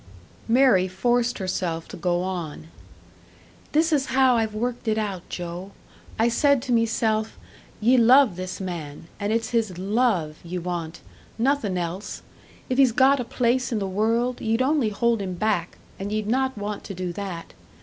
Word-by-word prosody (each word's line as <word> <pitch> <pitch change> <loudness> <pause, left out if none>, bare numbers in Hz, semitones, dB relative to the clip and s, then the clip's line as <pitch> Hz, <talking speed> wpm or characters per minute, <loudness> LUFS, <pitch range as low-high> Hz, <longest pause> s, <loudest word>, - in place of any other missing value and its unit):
Mary 230 -6 +4
forced 240 +6 +1
herself 180 -4 -2
to - - -9
go 175 0 0
on. 170 -4 -5 1.0
"This 320 +2 +2
is 280 -2 +1
how 260 -2 +5
I've 220 -2 0
worked 240 +2 -3
it 215 0 +1
out, 200 -4 -2
Joe! 180 +2 -6 0.4
I 225 - +3
said 270 +2 +3
to 255 - -4
meself, 225 -1 +1 0.4
'Ye 245 +4 +4
love 245 -2 +6
this 185 +1 -5
man; 165 -4 -6
and 205 0 -1
it's 225 0 -1
his 220 -7 0
love 190 -6 0
ye 175 +1 -5
want 175 -2 -4 0.4
nothin' 230 -6 +1
else! 180 +4 -4 0.4
If 255 +1 -1
he's 265 -3 +6
got 265 +3 +4
a - - -1
place 250 +2 0
in 230 - 0
the 200 - -1
world, 230 +6 0
ye'd 225 +3 +1
only 275 -4 +2
hold 230 +1 +1
him 185 -2 -4
back 175 -3 -1 0.2
and 200 +1 -4
ye'd 215 0 -1
not 260 +3 0
want 205 0 -4
to 195 - -6
do 180 -1 -4
that. 185 -3 -6
215 Hz, 170 wpm, -24 LUFS, 185-245 Hz, 1.0 s, love